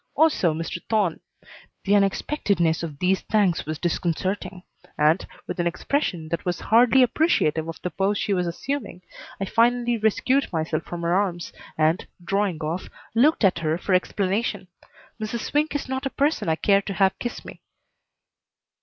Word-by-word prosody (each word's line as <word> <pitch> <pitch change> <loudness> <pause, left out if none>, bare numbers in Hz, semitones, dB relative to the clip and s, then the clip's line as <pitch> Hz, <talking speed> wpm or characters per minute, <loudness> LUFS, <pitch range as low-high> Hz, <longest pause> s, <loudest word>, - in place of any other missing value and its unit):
Also 305 - +3
Mr. 165 +2 -5
Thorne. 205 -7 +1 0.6
The 200 - +1
unexpectedness 195 - +1
of 160 -4 -6
these 185 +4 +1
thanks 200 -8 +1
was 155 0 -3
disconcerting 180 +3 -2 0.3
and, 155 +4 +3 0.2
with - - -6
an 175 - +1
expression 175 - -2
that 170 - -2
was 180 -1 -2
hardly 245 +4 +5
appreciative 225 - +1
of 165 - -7
the 180 - -2
pose 195 +4 0
she 200 - 0
was 180 -2 0
assuming, 200 0 -4 0.4
I 195 - -1
finally 240 +2 +2
rescued 255 +6 +1
myself 160 -2 -1
from 170 -1 -6
her 170 +1 +1
arms 180 -3 -1 0.2
and, 155 +2 +1 0.2
drawing 195 -3 -1
off, 165 +4 -3 0.2
looked 255 +4 +3
at 185 -4 +4
her 160 0 0
for 190 +1 -2
explanation. 195 +1 0 0.5
Mrs. 220 +2 -3
Swink 295 +4 0
is 290 - -2
not 265 +1 -2
a - - -3
person 285 - 0
I 160 - +3
care 200 +4 +3
to 195 - -5
have 190 +1 +2
kiss 240 - -5
me. - - -11
190 Hz, 165 wpm, -24 LUFS, 170-230 Hz, 0.6 s, hardly